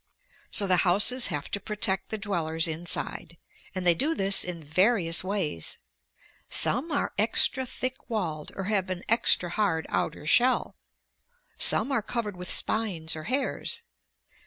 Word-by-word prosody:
So 205 - +2
the 185 -2 +3
houses 205 +9 +3
have 145 0 -4
to 200 - -2
protect 210 -1 -2
the 220 - -3
dwellers 170 -6 -1
inside, 165 0 -2 0.4
and 185 -1 -3
they 175 - +7
do 300 - -1
this 195 0 +4
in 175 -3 -6
various 175 +2 +2
ways. 185 - -2 0.7
Some 280 +8 +3
are 285 - -1
extra 250 +4 +2
thick 255 +2 -5
walled 165 -9 -3
or 195 - -4
have 195 -2 -1
an 185 -1 -4
extra 200 -6 +2
hard 175 -6 0
outer - - -2
shell. 250 +10 +2 0.8
Some 280 - +4
are 265 - +1
covered 210 -2 -4
with 180 0 -7
spines 180 -8 0
or 155 0 -8
hairs. 280 - -2
195 Hz, 145 wpm, -27 LUFS, 170-225 Hz, 0.8 s, they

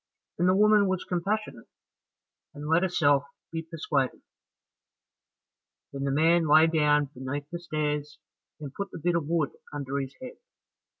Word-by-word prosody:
and 180 +1 +3
the 185 - +4
woman 210 0 +5
was 190 -1 -1
compassionate, 190 - -3 0.9
and 145 +1 -7
let 165 +2 +3
herself 145 -7 +3 0.3
be 165 -1 -3
persuaded. 155 -5 -2 1.7
Then 140 0 -3
the 140 - 0
man 165 +3 +3
lay 155 +2 +7
down 150 -3 +2
beneath 140 +2 -5
the 175 - -4
stairs, 150 -3 -3 0.4
and 145 -3 -8
put 200 0 -4
the - - -9
bit 175 +2 0
of 165 -4 -1
wood 165 -3 0 0.2
under 140 -1 -3
his 135 0 -6
head. 255 -1 -9
155 Hz, 145 wpm, -27 LUFS, 145-175 Hz, 1.7 s, lay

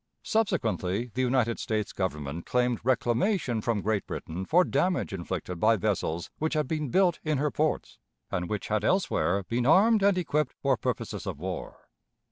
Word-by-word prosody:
Subsequently 115 - 0
the 130 - -1
United 125 -2 +1
States 110 -2 -2
Government 80 -4 -3
claimed 125 -2 +1
reclamation 125 - +1
from 110 -2 -1
Great 110 -1 0
Britain 90 +4 -5
for 175 - +4
damage 175 - 0
inflicted 90 0 -4
by 110 +4 +5
vessels 90 -5 -2
which 160 +1 -1
had 150 -3 +1
been 155 -2 -2
built 180 +2 +3
in 155 -2 0
her 145 +1 0
ports, 155 0 -1 0.3
and 90 -1 -2
which 105 -2 -3
had 105 -1 +1
elsewhere 105 - +1
been 120 +6 -1
armed 210 +7 +5
and 200 -1 +4
equipped 150 -5 0
for 135 -1 +2
purposes 110 - -3
of - - -3
war. 90 +2 -6
120 Hz, 165 wpm, -28 LUFS, 100-155 Hz, 0.3 s, by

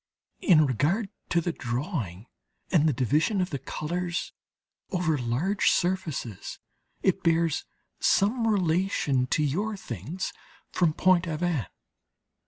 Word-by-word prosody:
In 155 -5 +6
regard 155 - +1 0.2
to 170 - +2
the 175 - -1
drawing 120 - -3 0.5
and 160 -4 +4
the - - +3
division 150 - +1
of 180 0 0
the 140 - -2
colours 175 +5 -3 0.6
over 175 -6 +1
large 140 - +1
surfaces, 170 - -1 0.5
it 190 - +2
bears 165 -2 +2 0.3
some 225 +4 +3
relation 175 - +1
to 155 - +1
your 200 +9 -1
things 140 - -5 0.4
from 170 -3 +2
Pont 185 0 +3
Aven. 160 - -1
165 Hz, 115 wpm, -27 LUFS, 140-185 Hz, 0.6 s, In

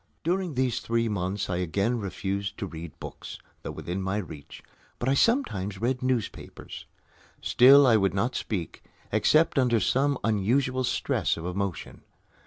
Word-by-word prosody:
During 175 -2 -1
these 130 -1 0
three 115 0 0
months 100 -1 -2
I 90 - -2
again 100 +7 0
refused 100 +1 -3
to 105 - -3
read 85 -3 -9
books, - - -8 0.2
though - - -6
within 90 +3 -4
my 95 +2 -1
reach, 80 -8 -8 0.3
but 120 - -3
I 135 - +3
sometimes 105 - +1
read 125 +2 -1
newspapers. 125 -5 -4 0.5
Still 135 +3 +7
I 115 -4 +5
would 95 -3 +1
not 115 +6 0
speak, 90 -7 -4 0.3
except 155 -2 +3
under 120 -3 +3
some 135 +7 +1
unusual 125 +5 +1
stress 125 - 0
of 80 - -6
emotion. 90 -2 -4
110 Hz, 150 wpm, -27 LUFS, 95-130 Hz, 0.5 s, Still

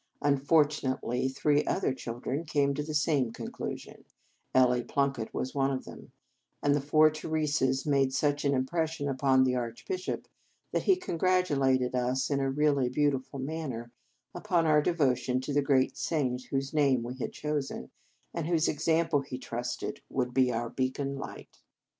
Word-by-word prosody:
Unfortunately, 140 -3 +2
three 145 +2 +2
other - - 0
children 130 +4 -4
came 145 -3 +1
to 145 - -2
the 150 +1 -4
same 145 -5 +2
conclusion, - - -7 0.5
Ellie 125 -1 +4
Plunkett 135 -5 -1
was 130 - -3
one 135 -1 +1
of 130 -1 -3
them, - - -11 0.5
and 145 - +4
the 145 - +1
four 155 +2 +5
Theresas 150 -4 0
made 140 -3 +2
such 145 +2 0
an 140 -1 +2
impression 155 +3 -1
upon 130 -1 +3
the 130 -1 +2
Archbishop 125 +10 -4 0.4
that - - 0
he 385 - +5
congratulated 160 - +1
us 125 +3 0
in 140 - +2
a 135 0 0
really 140 -2 +2
beau 145 +3 +2
tiful 135 +1 -5
manner 135 -5 -4 0.4
upon 175 -2 +1
our 155 -1 +5
devotion 130 -6 +1
to 140 +2 -4
the 145 - +3
great 135 -2 +2
saint 130 -6 -1
whose 135 +1 -3
name 140 -5 +3
we 125 +2 -6
had - - -3
chosen, 145 - -4 0.4
and 165 -2 -3
whose 165 -2 +2
example, 160 0 +1
he 135 -2 -6
trusted, 120 -1 -4
would 125 -2 -1
be 130 -1 +3
our 115 0 -2
beacon 135 +1 -2
light. 135 - -9
140 Hz, 160 wpm, -29 LUFS, 130-150 Hz, 0.5 s, four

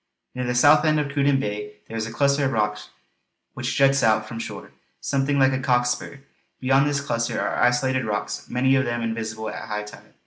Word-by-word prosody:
Near 125 0 -3
the 125 - -1
south 145 +5 +6
end 155 -1 +3
of 145 -1 -2
Cruden 140 -1 +2
Bay 105 -2 -4
there 115 - -8
is 110 0 -2
a - - -7
cluster 140 +3 +2
of 135 - 0
rocks 105 -1 -1 0.6
which - - -3
juts 135 0 +4
out 110 -1 +2
from 115 +1 -7
shore, - - -7 0.3
something 140 +1 0
like 135 -1 +4
a 130 - -1
cock's 125 -1 +2
spur. 135 +2 -6 0.4
Beyond 135 +2 +3
this 145 -1 0
cluster 115 -4 -2
are - - -1
isolated 130 +1 +2
rocks, 105 -1 -4
many 130 +2 +2
of 135 +1 +2
them 120 -1 -2
invisible 110 -1 -4
at - - -7
high 105 0 -3
tide. 105 - -13
125 Hz, 210 wpm, -23 LUFS, 110-135 Hz, 0.6 s, south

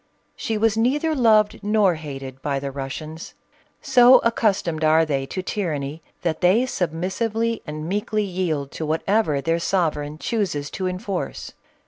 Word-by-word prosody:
She 225 - -2
was 220 0 +2
neither 285 +8 +1
loved 220 -6 +3
nor 205 -3 +3
hated 135 -4 -8
by 140 -2 -1
the 135 0 -4
Russians. 150 +4 -7 0.5
So 250 +1 +7
accustomed 195 -8 +1
are 160 +1 +4
they 135 -3 -2
to 185 +6 -4
tyranny, 155 -6 -3 0.2
that 165 -3 -1
they 195 +8 +4
submissively 220 +5 -2
and 155 +1 -5
meekly 210 +3 -1
yield 175 -7 -2
to 160 - -5
whatever 160 -1 +1
their 165 +3 0
sovereign 155 -5 -1
chooses 165 -8 -2
to 185 - -3
enforce. 185 +1 -4
180 Hz, 140 wpm, -23 LUFS, 155-215 Hz, 0.5 s, So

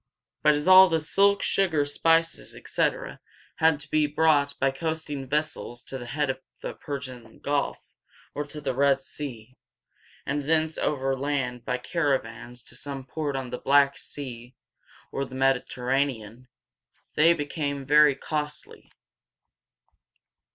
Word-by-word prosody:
But 150 -1 +5
as 150 +3 -2
all 185 0 +9
the 165 -1 +2
silk, 200 +6 +2
sugar, 165 -7 +2
spices, 165 +3 +1
etc., - - -2 0.4
had 160 -3 +3
to 150 - -12
be 155 -1 +3
brought 145 -2 +2
by 135 0 +2
coasting 150 -2 -4
vessels 150 -5 -2
to 135 - -7
the 120 - -8
head 145 +1 0
of 130 - -9 0.2
the - - -4
Per´sian 130 -5 -8
Gulf 145 0 -1 0.6
or 145 - -2
the 145 -2 -4
Red 140 +1 +3
Sea, 130 -3 -8 0.7
and 140 0 -2
thence 160 0 +1
overland 135 -3 -1
by 125 - -1
caravans 125 -5 -2
to - - -11
some 140 -3 -6
port 145 +1 -3
on 130 -2 -4
the - - -4
Black 140 0 +4
Sea 125 -3 -8 0.6
or 135 - -2
the 130 -1 -8
Mediterranean, 130 -2 -1 0.7
they 165 +3 +5
became 145 -2 -3
very 150 0 +6
costly. 150 0 -5
140 Hz, 130 wpm, -26 LUFS, 130-150 Hz, 0.7 s, all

